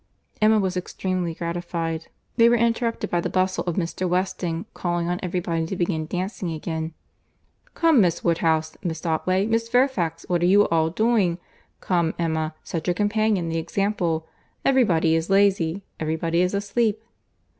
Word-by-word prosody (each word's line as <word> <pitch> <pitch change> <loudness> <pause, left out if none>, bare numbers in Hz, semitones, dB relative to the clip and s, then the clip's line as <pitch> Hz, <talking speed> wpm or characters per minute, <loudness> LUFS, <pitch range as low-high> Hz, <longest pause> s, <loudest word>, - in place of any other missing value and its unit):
Emma 215 +1 +5
was 190 -2 -1
extremely 180 -1 -2
gratified.—They 170 +6 -1
were 240 - +4
interrupted 235 0 0
by 175 - +1
the - - -2
bustle 185 0 0
of 175 -2 -2
Mr. 180 +1 -2
Weston 180 -2 -1
calling 175 -1 -2
on 180 +1 -1
every 180 0 -1
body 165 -1 -1
to 190 - -3
begin 170 -3 -1
dancing 180 0 -3
again. 160 0 -4 0.8
"Come 325 -8 +5
Miss 175 -3 +1
Woodhouse, 160 -2 +1
Miss 165 -2 -4
Otway, 185 +4 +1
Miss 230 +1 0
Fairfax, 240 - +1
what 175 -1 +1
are 175 - +3
you 205 +3 +5
all 160 -1 +2
doing?—Come 180 -4 -1
Emma, 160 -2 -1
set 165 0 -4
your 175 - +2
companions 205 -4 +1
the 165 - 0
example. 170 -2 -1 0.4
Every 265 -1 +5
body 165 -5 +2
is 165 +2 0
lazy! 195 -2 +2 0.2
Every 155 0 -1
body 165 +1 0
is 180 +2 +1
asleep!" 215 +2 0
175 Hz, 155 wpm, -24 LUFS, 165-200 Hz, 0.8 s, Emma